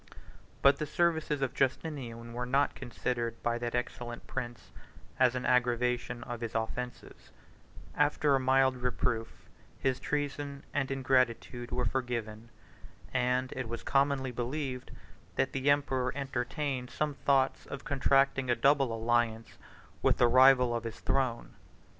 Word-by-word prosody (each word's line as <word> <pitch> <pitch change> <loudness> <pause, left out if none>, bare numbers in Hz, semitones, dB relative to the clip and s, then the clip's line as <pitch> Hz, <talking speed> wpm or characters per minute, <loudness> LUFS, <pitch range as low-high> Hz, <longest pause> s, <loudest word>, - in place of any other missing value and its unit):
But 140 0 +6
the 150 - -3
services 160 -3 +1
of 130 - -1
Justinian 130 -4 -2
were 125 +1 -3
not 140 +3 +2
considered 120 -2 -3
by 120 0 0
that 120 0 -3
excellent 120 -1 -4
prince 120 -2 -6 0.5
as 130 -1 +4
an 125 - -3
aggravation 125 -1 +1
of 120 -1 -6
his 115 -1 -5
offences: 125 +2 -5 0.6
after 145 0 +2
a 135 - +4
mild 130 0 +3
reproof, 125 -2 -2 0.3
his 130 -1 0
treason 145 -1 -3
and 135 -2 0
ingratitude 125 -2 0
were 125 0 -1
forgiven; 115 -3 -3 0.6
and 125 0 +1
it 130 -3 -4
was 115 0 -5
commonly 135 -1 +1
believed, 125 +1 -4 0.5
that - - +1
the 135 +1 +1
emperor 135 -3 +2
entertained 135 -1 -3
some 150 -1 -1
thoughts 135 -1 +1
of 140 0 -7
contracting 135 -1 +2
a 120 - +4
double 140 -2 +3
alliance 115 0 0 0.4
with - - +3
the 120 - +5
rival 130 0 +6
of 120 -1 -2
his 115 -1 -6
throne. 130 -4 -1
125 Hz, 135 wpm, -31 LUFS, 120-135 Hz, 0.6 s, But